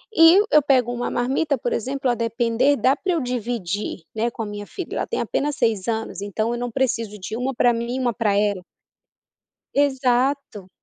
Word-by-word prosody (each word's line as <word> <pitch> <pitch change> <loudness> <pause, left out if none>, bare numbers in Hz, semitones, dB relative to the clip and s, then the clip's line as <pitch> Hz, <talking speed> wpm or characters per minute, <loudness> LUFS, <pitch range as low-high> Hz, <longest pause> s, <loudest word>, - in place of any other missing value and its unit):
e 330 +4 +8
eu 300 - +6
pego 255 -3 +2
uma 245 0 -3
marmita, 270 +4 0
por 240 - -2
exemplo, 265 +3 -1
a 240 - +2
depender 230 +4 +1
dá 260 +2 +3
pra 370 +3 -2
eu 330 - 0
dividir, 230 -7 -3 0.2
né, 230 +2 0
com 230 - -7
a - - -4
minha 205 0 -6
filha, 370 - -7
ela - - -2
tem - - -2
apenas 290 0 -1
6 220 -6 0
anos, 225 -3 -3
então 215 +3 -2
eu 240 - -3
não 245 0 -3
preciso 230 -4 -1
de 205 +3 -5
uma 255 +3 -2
pra 245 0 +3
mim 235 +2 -3
e - - -2
uma 245 -2 0
pra 215 -3 +1
ela. 205 -2 +1 1.1
Exato 265 -5 +1
240 Hz, 200 wpm, -22 LUFS, 220-265 Hz, 1.1 s, e